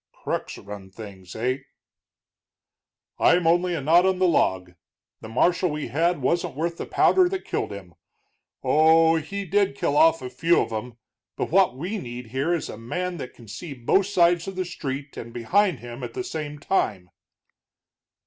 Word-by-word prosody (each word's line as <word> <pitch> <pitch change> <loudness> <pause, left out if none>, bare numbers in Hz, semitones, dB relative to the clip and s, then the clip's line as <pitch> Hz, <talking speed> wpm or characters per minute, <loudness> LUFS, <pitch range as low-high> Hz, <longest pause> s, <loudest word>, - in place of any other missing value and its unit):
"Crooks - - -4
run 100 -1 -9
things, 95 -3 -11
heh?" 125 +4 -1 1.6
"I'm 175 -1 +4
only 175 +2 +3
a 155 - -3
knot 165 +6 +5
on 190 -1 +1
a - - +2
log. 95 - +1 0.5
The 110 - -10
marshal 175 +10 +2
we 150 -4 -4
had 165 +2 0
wasn't 170 0 0
worth 165 +3 -2
the - - -5
powder 370 -1 +4
that 385 0 -4
killed - - -2
him. 95 -4 -9 0.7
Oh 160 +1 +5
h, 155 - -10
he 200 0 -4
did 200 -4 +1
kill 145 - 0
off 165 -1 +4
a 125 - -4
few 165 +7 +3
of - - -1
'em, 115 +2 -5 0.4
but - - -3
what 185 -8 +3
we 185 +9 -3
need 120 -5 -8
here 135 +7 -1
is 170 -3 -1
a - - -8
man 180 +10 -3
that 130 -4 -8
can 115 - -15
see 145 - -7
both 160 +11 +2
sides 175 -3 +3
of 195 - -5
the 185 0 -2
street 140 -4 -6
and 115 - -7
behind 175 - +1
him 120 +1 -8
at 115 -1 -6
the - - -2
same 150 -4 -5
time." 105 - -1
155 Hz, 180 wpm, -24 LUFS, 120-175 Hz, 1.6 s, knot